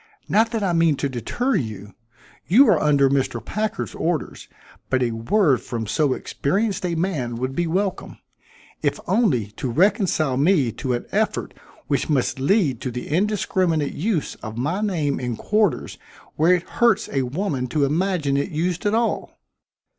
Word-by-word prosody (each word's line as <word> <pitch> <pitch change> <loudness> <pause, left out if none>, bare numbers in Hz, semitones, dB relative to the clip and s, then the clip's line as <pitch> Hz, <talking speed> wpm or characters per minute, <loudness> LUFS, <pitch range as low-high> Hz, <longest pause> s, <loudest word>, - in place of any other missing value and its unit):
Not 220 +3 +3
that 225 -3 -2
I 185 -3 +1
mean 165 -2 +3
to 140 - -1
deter 135 - -2
you. 105 - -3 0.5
You 250 +10 +6
are 175 -7 +4
under 145 -2 +4
Mr. 135 -3 0
Packard's 215 +1 -3
orders, 165 -2 -3 0.4
but 130 -1 +2
a 120 - 0
word 135 - +2
from 115 -2 -4
so 140 +5 +1
experienced 195 - -1
a 170 - -2
man 155 -9 -2
would 130 +3 -3
be 175 -1 0
welcome, 190 +3 -2 0.6
if - - 0
only 130 - +1
to 130 - -3
reconcile 175 - +2
me 145 -4 +3
to 125 +3 -3
an 120 - -3
effort - - -1 0.3
which 140 +1 -1
must 135 -2 0
lead 140 - +2
to 130 - -3
the 125 0 -6
indiscriminate 180 -3 0
use 180 -2 -1
of 110 -1 -7
my 160 - -1
name 160 -9 0
in 125 -2 -3
quarters 210 - 0 0.4
where 170 +4 +4
it 175 - -3 0.2
hurts 225 -3 +4
a 135 - +1
woman 135 0 -2
to 140 +3 +1
imagine 155 -2 0
it 140 - -1
used 175 +4 -1
at 205 - +2
all." 230 0 -1
155 Hz, 165 wpm, -22 LUFS, 130-195 Hz, 0.6 s, You